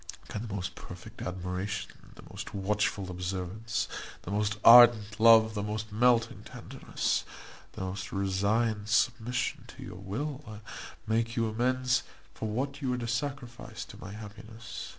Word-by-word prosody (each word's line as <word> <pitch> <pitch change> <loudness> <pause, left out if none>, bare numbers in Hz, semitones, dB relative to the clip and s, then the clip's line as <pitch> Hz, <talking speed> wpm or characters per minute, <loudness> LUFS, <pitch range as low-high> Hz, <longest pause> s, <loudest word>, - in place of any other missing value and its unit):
Can 105 - -4
the - - -8
most 95 -2 -3
perfect - - -11
admiration, 90 +2 -3 0.2
the - - -13
most - - -8
watchful 100 -1 0
observance, 95 +4 -3 0.4
the 90 - -6
most 105 0 0
ardent 115 -3 +8
love, 110 -1 +7
the 105 - -2
most 105 +1 -4
melting 120 +1 +2
tenderness, - - -2 0.5
the - - -7
most 95 0 -4
resigned 105 +3 0
submission 115 +3 +1
to - - -11
your 90 - -8
will, 115 +3 -5 0.5
make 115 +1 0
you 115 -1 +1
amends 125 +3 +1 0.3
for 110 - -4
what 140 +6 -2
you 130 -2 0
are - - -3
to 120 -1 -4
sacrifice 120 -1 -4
to - - -13
my 95 - -7
happiness? 110 +2 -9
110 Hz, 145 wpm, -30 LUFS, 100-120 Hz, 0.5 s, ardent